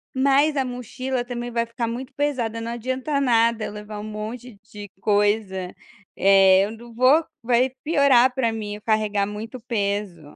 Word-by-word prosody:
"Mas 280 Hz, +3 st, +3 dB
a 270 Hz, -, +1 dB
mochila 250 Hz, +1 st, -4 dB
também 240 Hz, 0 st, -5 dB
vai 235 Hz, 0 st, 0 dB
ficar 230 Hz, 0 st, -4 dB
muito 250 Hz, +3 st, -6 dB
pesada, 245 Hz, -6 st, -1 dB
não 230 Hz, +1 st, -4 dB
adianta 260 Hz, +4 st, -2 dB
nada, 230 Hz, -3 st, +2 dB
levar 210 Hz, 0 st, -8 dB
um -, -, -7 dB
monte 215 Hz, +2 st, -7 dB, 0.2 s
de 205 Hz, -1 st, -8 dB
coisa, 205 Hz, -3 st, 0 dB, 0.4 s
eh, 195 Hz, -1 st, +6 dB
eu 210 Hz, -, -6 dB
não 230 Hz, +1 st, -12 dB
vou 260 Hz, +7 st, +4 dB, 0.2 s
vai 250 Hz, +2 st, +2 dB
piorar 280 Hz, -5 st, +4 dB
para 235 Hz, -4 st, +1 dB
mim, 210 Hz, -2 st, -5 dB
eu 210 Hz, -, -11 dB
carregar 215 Hz, -2 st, +1 dB
muito 220 Hz, +5 st, -7 dB
peso". 200 Hz, -5 st, -2 dB
230 Hz, 160 wpm, -23 LUFS, 210-255 Hz, 0.4 s, eh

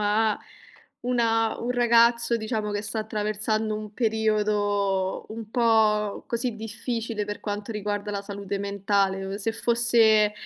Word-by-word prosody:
a 210 Hz, +1 st, +2 dB, 0.7 s
una 225 Hz, -2 st, +1 dB
un 240 Hz, -, -2 dB
ragazzo 235 Hz, -1 st, +4 dB
diciamo 215 Hz, -1 st, -2 dB
che 205 Hz, -, -2 dB
sta 220 Hz, +1 st, -3 dB
attraversando 215 Hz, 0 st, -1 dB
un 215 Hz, -1 st, -8 dB
periodo 210 Hz, -4 st, 0 dB
un 220 Hz, 0 st, -7 dB
po' 220 Hz, -3 st, +2 dB
così 235 Hz, -1 st, -2 dB
difficile 225 Hz, 0 st, -3 dB
per 205 Hz, 0 st, -5 dB
quanto 205 Hz, +1 st, -5 dB
riguarda 205 Hz, -1 st, -3 dB
la 200 Hz, -1 st, -3 dB
salute 200 Hz, -1 st, -5 dB
mentale, 200 Hz, -1 st, 0 dB
uhm, 195 Hz, -, -4 dB
se 220 Hz, +2 st, -2 dB
fosse, 230 Hz, -2 st, +4 dB
215 Hz, 130 wpm, -26 LUFS, 205-225 Hz, 0.7 s, ragazzo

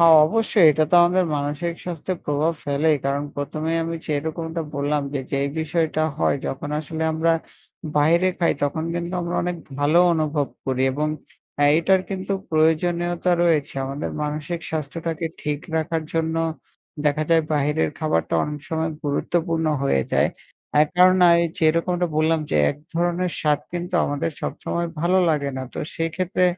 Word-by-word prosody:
হ্যাঁ, 165 Hz, -1 st, +8 dB
অবশ্যই 215 Hz, -2 st, +3 dB
এটা 155 Hz, +1 st, +2 dB
তো -, -, +3 dB
আমাদের 180 Hz, +1 st, +3 dB
মানসিক 145 Hz, +4 st, -2 dB
স্বাস্থ্যের 175 Hz, +1 st, -4 dB
প্রভাব 150 Hz, +3 st, +1 dB
ফেলেই। 150 Hz, +2 st, +2 dB
কারণ 140 Hz, +1 st, 0 dB
১ম 145 Hz, +2 st, -4 dB
এই 165 Hz, -, +1 dB
আমি 165 Hz, 0 st, -3 dB
যেরকমটা 160 Hz, +2 st, -3 dB
বললাম, 145 Hz, +1 st, 0 dB
যে 140 Hz, -, 0 dB
যেই 140 Hz, +1 st, +1 dB
বিষয়টা 160 Hz, 0 st, 0 dB, 0.2 s
হয় -, -, +2 dB
যখন 140 Hz, +2 st, -4 dB
আসলে 160 Hz, +1 st, -5 dB
আমরা 165 Hz, +1 st, +2 dB, 0.6 s
বাইরে 170 Hz, +5 st, +4 dB
খাই 170 Hz, -, +3 dB
তখন 160 Hz, +3 st, 0 dB
কিন্তু 175 Hz, +1 st, -3 dB
আমরা 170 Hz, 0 st, -3 dB
অনেক 175 Hz, 0 st, -2 dB, 0.2 s
ভালো 150 Hz, +4 st, +4 dB
অনুভব 155 Hz, -3 st, 0 dB, 0.2 s
করি 130 Hz, 0 st, 0 dB
এবং 150 Hz, +2 st, -1 dB, 0.7 s
এটার 190 Hz, +3 st, +3 dB
কিন্তু 190 Hz, +1 st, -3 dB, 0.2 s
প্রয়োজনীয়তা 170 Hz, +2 st, +1 dB
রয়েছে। 155 Hz, -5 st, +1 dB
আমাদের 140 Hz, +3 st, -4 dB
মানসিক 150 Hz, +3 st, -3 dB
স্বাস্থ্যটাকে 160 Hz, +2 st, -3 dB, 0.2 s
ঠিক 150 Hz, -1 st, -1 dB, 0.2 s
রাখার 160 Hz, 0 st, -1 dB
জন্য, 165 Hz, 0 st, 0 dB, 0.7 s
দেখা 150 Hz, +1 st, +2 dB
যায় 165 Hz, -1 st, +5 dB
বাহিরের 150 Hz, +1 st, +1 dB
খাবারটা 155 Hz, -, 0 dB
অনেক 150 Hz, -1 st, -5 dB
সময় 160 Hz, 0 st, -1 dB
গুরুত্বপূর্ণ 160 Hz, +3 st, 0 dB, 0.2 s
হয়ে 70 Hz, -, +2 dB
যায়। -, -, +3 dB, 0.5 s
এক 155 Hz, -, +1 dB
কারণ 185 Hz, +1 st, +6 dB, 0.4 s
যেরকমটা 170 Hz, +3 st, +2 dB
বললাম 160 Hz, +1 st, +2 dB
যে -, -, +1 dB
এক -, -, -7 dB, 0.2 s
ধরনের 175 Hz, +1 st, 0 dB
স্বাদ 150 Hz, -2 st, +2 dB
কিন্তু 175 Hz, +1 st, -4 dB
আমাদের 145 Hz, +3 st, -1 dB
সবসময় 170 Hz, 0 st, -3 dB
ভালো 180 Hz, +3 st, +3 dB
লাগে 145 Hz, -3 st, 0 dB
না। 130 Hz, -, -3 dB
তো -, -, -6 dB, 0.2 s
সেক্ষেত্রে 180 Hz, +3 st, 0 dB
160 Hz, 150 wpm, -23 LUFS, 150-170 Hz, 0.7 s, হ্যাঁ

